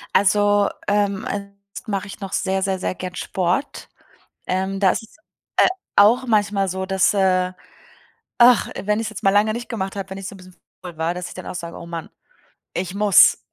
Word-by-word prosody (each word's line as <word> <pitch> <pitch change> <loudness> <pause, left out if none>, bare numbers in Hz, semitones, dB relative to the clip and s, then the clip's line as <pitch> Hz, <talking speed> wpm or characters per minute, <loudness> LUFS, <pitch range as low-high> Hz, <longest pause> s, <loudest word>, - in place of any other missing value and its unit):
Also, 205 +1 +4 0.2
ähm, 205 0 +1
ansonsten 200 +1 -7
mache 200 0 -2
ich 200 - -10
noch 195 -2 -7
sehr, 190 -1 0
sehr, 190 -1 -1
sehr 185 - -2
gern 180 0 -6
Sport. 185 +13 -2 0.6
Ähm, 190 +1 -1
das 195 +2 +2
ist, 225 - -17 0.4
äh, - - +6 0.3
auch 235 +6 +5
manchmal 205 -3 +1
so, 190 +1 -3
dass, 190 0 +2
äh, 185 -2 +2 0.9
ach, 240 -1 +6
wenn 210 +2 0
ich's 225 -1 -3
jetzt 215 - -9
mal 195 - +4
lange 205 +2 +3
nicht 235 +2 -6
gemacht 195 -5 -4
habe, 195 -1 -5
wenn 190 - -6
ich 195 - -7
so - - -9
'n - - -13
bisschen 185 -1 -16 0.3
faul 175 -3 -9
war, 165 +2 -1
dass 180 0 -5
ich - - -11
dann 185 - -9
auch - - -6
sage: 170 -1 -6
„Oh 170 - -9
man, 170 -1 -6 0.7
ich 180 0 -3
muss.“ 205 -3 +6
195 Hz, 200 wpm, -21 LUFS, 185-205 Hz, 0.9 s, äh